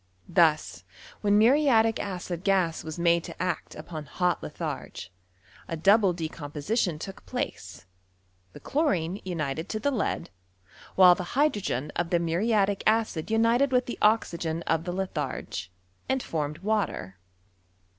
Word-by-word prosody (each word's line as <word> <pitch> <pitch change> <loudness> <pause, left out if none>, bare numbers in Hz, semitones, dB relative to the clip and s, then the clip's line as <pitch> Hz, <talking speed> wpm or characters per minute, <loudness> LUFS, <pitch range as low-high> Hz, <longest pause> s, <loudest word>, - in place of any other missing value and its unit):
Thus, 155 - +2 0.4
when 205 -1 +3
muriatic 225 -2 +4
acid 180 -2 -4
gas 185 -5 +1
was 160 0 -6
maite 170 0 +3
to - - -9
act 180 -1 -3
lapoa 155 -3 -8
hot 180 -1 0
litharge, 90 - -6 0.6
a 165 - -4
double 195 +3 +5
decomposition 160 +3 -2
took 190 +5 -8
fteoe, - - -5 0.7
liie - - -12
chlorine 195 - 0
united 160 -2 -3
to 215 - -2
the 285 +6 0
lead, 230 - -2 0.6
while 185 -1 +8
the 180 +7 -6
hy 295 +2 +5
dvocen 150 - -3
of 175 -1 -1
the 175 - +3
muriatic 195 +4 +1
acid 215 -6 +1
united 230 +5 +3
with 250 -1 +2
the 240 - -6
oxygen 170 -6 +1
af 165 +2 0
rae 175 - -2
lithar^, 150 - -4 0.4
and 265 -1 0
formed 150 -1 -3
water. 195 - -1
180 Hz, 135 wpm, -27 LUFS, 160-220 Hz, 0.7 s, while